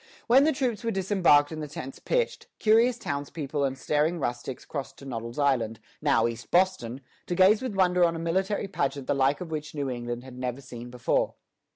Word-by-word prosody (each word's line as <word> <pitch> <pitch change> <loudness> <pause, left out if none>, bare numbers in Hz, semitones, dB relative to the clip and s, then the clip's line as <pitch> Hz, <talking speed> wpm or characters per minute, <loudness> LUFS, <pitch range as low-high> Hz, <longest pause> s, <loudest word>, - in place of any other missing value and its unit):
When 265 +4 +6
the 315 - +4
troops 250 -5 -1
were 230 - 0
disembarked 185 -7 +3
and 155 -1 -5
the 150 - -4
tents 135 -2 -7
pitched, - - -1
curious 230 +3 +4
townspeople 145 - -3
and 135 -1 -1
staring 150 +5 +1
rustics 125 -1 -4
crossed 140 -3 -6
to 140 - -12
Noddle's 115 -2 -5
Island, 120 -6 +1 0.2
now 140 -6 +3
East 115 0 -4
Boston, 175 -9 +1 0.3
to 175 - -1
gaze 190 +4 +5
with 255 -6 -3
wonder 180 -2 +3
on 170 -1 +3
a - - -3
military 190 +5 -1
pageant 140 -7 -2
the - - +1
like 140 +3 +2
of 170 -3 -6
which 150 -1 -5
New 140 -3 -2
England 120 0 -4
had 130 -1 -11
never 125 0 -3
seen 125 -2 -9
before. 125 -1 0
145 Hz, 200 wpm, -27 LUFS, 130-185 Hz, 0.3 s, When